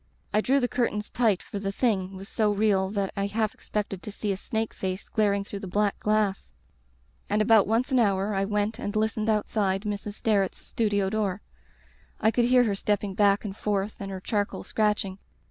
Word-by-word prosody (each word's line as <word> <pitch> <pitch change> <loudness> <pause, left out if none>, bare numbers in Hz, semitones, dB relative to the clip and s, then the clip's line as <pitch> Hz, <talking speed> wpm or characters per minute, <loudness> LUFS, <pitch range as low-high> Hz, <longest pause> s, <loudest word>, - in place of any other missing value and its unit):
I 215 - +4
drew 270 +5 +3
the 245 - +1
curtains 230 -4 -1
tight 220 -6 +2
for 200 - -6
the 195 0 -2
Thing 195 -4 0
was 195 +1 -9
so 215 -2 +1
real 200 -2 +2
that 200 -1 -2
I 200 0 0
half 215 +1 -1
expected 200 -3 -4
to 210 - -7
see 205 0 -2
a - - 0
snake 220 +3 -3
face 190 +1 -4
glaring 200 -2 +1
through 200 0 -7
the 195 - -7
black 205 +2 0
glass. 210 -2 0 0.8
And 210 - +2
about 215 -1 +5
once 230 +5 +1
an 260 - +4
hour 200 -2 +2
I 195 0 +1
went 210 +2 -1
and 205 -3 -4
listened 220 0 0
outside 205 -2 +1
Mrs. 205 -1 -4
Sterret's 200 -4 +1
studio 205 -4 -1
door. 205 -3 -1 0.8
I 220 - +3
could 240 0 +2
hear 250 0 +5
her 215 -4 +1
stepping 205 0 -1
back 200 +1 +3
and 195 -2 -4
forth 205 0 -1
and 195 - -5
her 190 -1 -5
charcoal 205 +2 -2
scratching. 210 -3 0
205 Hz, 195 wpm, -27 LUFS, 195-215 Hz, 0.8 s, about